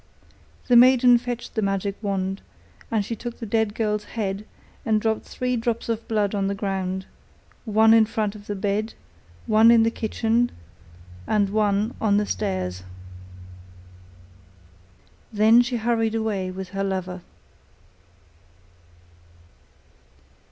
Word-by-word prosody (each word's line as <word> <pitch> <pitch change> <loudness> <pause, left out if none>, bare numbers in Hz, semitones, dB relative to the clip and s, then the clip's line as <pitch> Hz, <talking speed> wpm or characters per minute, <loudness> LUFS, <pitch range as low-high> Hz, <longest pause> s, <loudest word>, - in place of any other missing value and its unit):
The 245 - +4
maiden 250 0 +6
fetched 245 -1 -6
the 220 - -1
magic 195 0 -1
wand, 195 -2 -2 0.5
and 215 -3 0
she 230 - -4
took 240 +1 -7
the 230 - -6
dead 220 -1 0
girl's 210 -2 -1
head 205 -1 -4 0.4
and 220 -1 +2
dropped 220 0 -1
three 250 0 -2
drops 235 0 -2
of 230 0 -3
blood 210 -2 0
on 200 -1 0
the 200 - -2
ground, 190 -2 -3 0.6
one 220 0 +5
in 225 -1 +5
front 215 -2 -2
of 210 -1 -13
the 205 - -3
bed, 205 +3 -2 0.5
one 220 +1 +5
in 230 -1 +6
the 225 - +1
kitchen, 230 +2 0 0.8
and 205 -2 +1
one 210 +1 +1
on 205 -2 +3
the 210 - +1
stairs. 185 - -3 2.5
Then 220 +2 +5
she 245 0 -2
hurried 225 -1 0
away 210 -4 -2
with 185 0 -7
her 195 +1 -3
lover. 185 -2 -3
215 Hz, 130 wpm, -23 LUFS, 200-230 Hz, 2.5 s, maiden